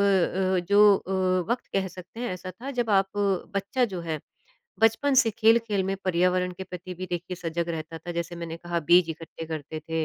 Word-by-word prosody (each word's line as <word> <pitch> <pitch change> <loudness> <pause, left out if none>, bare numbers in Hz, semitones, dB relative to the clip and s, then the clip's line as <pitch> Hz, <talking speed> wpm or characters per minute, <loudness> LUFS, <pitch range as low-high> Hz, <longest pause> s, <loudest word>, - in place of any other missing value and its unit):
अ, 190 -1 +2
जो 200 0 +4 0.2
अ, 190 - -9 0.4
वक़्त 245 - -1
कह 195 -1 +1
सकते 185 +5 -11
हैं 245 - -2
ऐसा 185 0 -6
था 240 +10 -7
जब 240 -4 -1
आप 195 -1 +3 0.4
बच्चा 200 +6 +1
जो 190 -6 -4
है, 160 -2 -3 0.6
बचपन 225 +6 +3
से 250 -3 +5
खेल-खेल 220 -1 +3
में 195 0 -1
पर्यावरण 180 0 +2
के 190 +2 -7
प्रति 180 0 -8
भी 185 +1 -6
देखिए 175 +1 -3
सजग 170 0 -3
रहता 165 0 -5
था। 175 +1 -6
जैसे 170 0 -4
मैंने 165 -1 -5
कहा 170 0 -3
बीज 175 -1 +6
इकट्ठे 165 0 -7
करते 155 0 -5
थे 160 0 0
185 Hz, 195 wpm, -26 LUFS, 170-200 Hz, 0.6 s, बीज